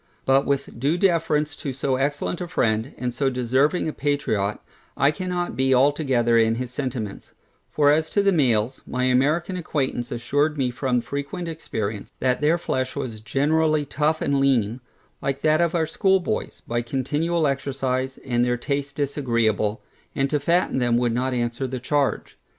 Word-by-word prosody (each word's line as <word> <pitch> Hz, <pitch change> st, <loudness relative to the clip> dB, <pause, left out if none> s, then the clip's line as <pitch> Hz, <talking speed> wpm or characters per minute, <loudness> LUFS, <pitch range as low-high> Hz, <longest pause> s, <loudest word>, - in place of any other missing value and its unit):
But 135 Hz, +1 st, +3 dB
with 140 Hz, -3 st, -2 dB
due 145 Hz, +7 st, +1 dB
deference 160 Hz, -5 st, +1 dB
to 140 Hz, -, -4 dB
so 130 Hz, +1 st, -1 dB
excellent 145 Hz, +6 st, -1 dB
a 175 Hz, -, -3 dB
friend, 110 Hz, -3 st, 0 dB
and 125 Hz, -1 st, -3 dB
so 135 Hz, +2 st, +1 dB
deserving 130 Hz, +7 st, +1 dB
a 155 Hz, -, -2 dB
patriot, 110 Hz, -9 st, -1 dB, 0.4 s
I 140 Hz, -, +4 dB
cannot 180 Hz, -2 st, -3 dB
be 130 Hz, +1 st, +3 dB
altogether 130 Hz, -4 st, +3 dB
in 115 Hz, 0 st, +3 dB
his 125 Hz, 0 st, -4 dB
sentiments; 125 Hz, -6 st, -5 dB, 0.3 s
for 145 Hz, -1 st, +4 dB
as 155 Hz, +1 st, +2 dB
to 205 Hz, -, +1 dB
the 200 Hz, -, +4 dB
males, 125 Hz, -, +1 dB
my 125 Hz, 0 st, -2 dB
American 145 Hz, +8 st, +2 dB
acquaintance 135 Hz, -7 st, -2 dB
assured 145 Hz, +6 st, 0 dB
me 130 Hz, -3 st, 0 dB
from 125 Hz, -1 st, 0 dB
frequent 140 Hz, +7 st, -5 dB
experience, 110 Hz, -10 st, -4 dB
that 125 Hz, +1 st, +1 dB
their 155 Hz, +3 st, +3 dB
flesh 130 Hz, -6 st, -2 dB
was 125 Hz, -6 st, -5 dB
generally 150 Hz, +6 st, +1 dB
tough 150 Hz, +3 st, 0 dB
and 140 Hz, -1 st, +1 dB
lean, 125 Hz, -4 st, +1 dB, 0.4 s
like 135 Hz, 0 st, -2 dB
that 155 Hz, +1 st, +3 dB
of 170 Hz, 0 st, +1 dB
our 165 Hz, -1 st, +2 dB
schoolboys, 190 Hz, +3 st, 0 dB
by 120 Hz, 0 st, 0 dB
continual 145 Hz, +7 st, -1 dB
exercise, 135 Hz, -2 st, -1 dB
and 120 Hz, -2 st, +1 dB
their 125 Hz, 0 st, +1 dB
taste 140 Hz, +2 st, -3 dB
disagreeable, 115 Hz, -6 st, 0 dB, 0.3 s
and 135 Hz, 0 st, 0 dB
to 150 Hz, -, +2 dB
fatten 170 Hz, -1 st, +1 dB
them 120 Hz, -1 st, +2 dB
would 120 Hz, -1 st, +1 dB
not 130 Hz, +2 st, 0 dB
answer 120 Hz, +1 st, -1 dB
the 130 Hz, 0 st, -4 dB
charge. 140 Hz, +3 st, -1 dB
135 Hz, 165 wpm, -24 LUFS, 125-150 Hz, 0.4 s, I